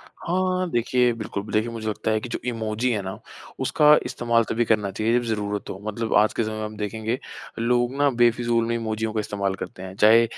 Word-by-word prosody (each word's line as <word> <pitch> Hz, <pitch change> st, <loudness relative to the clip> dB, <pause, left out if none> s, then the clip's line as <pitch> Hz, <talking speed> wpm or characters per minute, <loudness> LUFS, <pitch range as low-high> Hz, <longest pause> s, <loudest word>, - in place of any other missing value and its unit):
हाँ, 185 Hz, +1 st, -2 dB
देखिए, 120 Hz, +1 st, +2 dB
बिल्कुल 110 Hz, -3 st, -5 dB
बिल 105 Hz, -, -9 dB
देखिए 110 Hz, +2 st, +1 dB
मुझे 110 Hz, -1 st, -5 dB
लगता 110 Hz, +1 st, -2 dB
है 110 Hz, 0 st, +1 dB
कि 125 Hz, -, -7 dB
जो -, -, -3 dB
इमोजी 115 Hz, +1 st, -1 dB
है 105 Hz, -, 0 dB
ना, 95 Hz, 0 st, -6 dB, 0.4 s
उसका 150 Hz, 0 st, +5 dB
इस्तेमाल 120 Hz, -1 st, +1 dB
तभी 120 Hz, +1 st, +1 dB
करना 105 Hz, -3 st, +1 dB
चाहिए 110 Hz, +4 st, +1 dB
जब 120 Hz, -, -3 dB
ज़रूरत 105 Hz, -2 st, -2 dB
हो। 95 Hz, -, -6 dB
मतलब 110 Hz, +1 st, -2 dB
आज 105 Hz, +1 st, +5 dB
के 115 Hz, -, 0 dB
समय 110 Hz, 0 st, -3 dB
में 110 Hz, -, -3 dB
हम 105 Hz, 0 st, -6 dB
देखेंगे, 110 Hz, +3 st, -2 dB, 0.4 s
लोग 120 Hz, +2 st, +1 dB
ना 145 Hz, 0 st, +4 dB
बेफ़िज़ूल 120 Hz, -1 st, +2 dB
में 115 Hz, -, 0 dB
इमोजियों 110 Hz, -1 st, -2 dB
का 110 Hz, -, 0 dB
इस्तेमाल 100 Hz, -2 st, -2 dB
करते 95 Hz, -1 st, -7 dB
हैं। 95 Hz, 0 st, -7 dB
चाहे 110 Hz, +3 st, +6 dB
110 Hz, 220 wpm, -24 LUFS, 105-120 Hz, 0.4 s, चाहे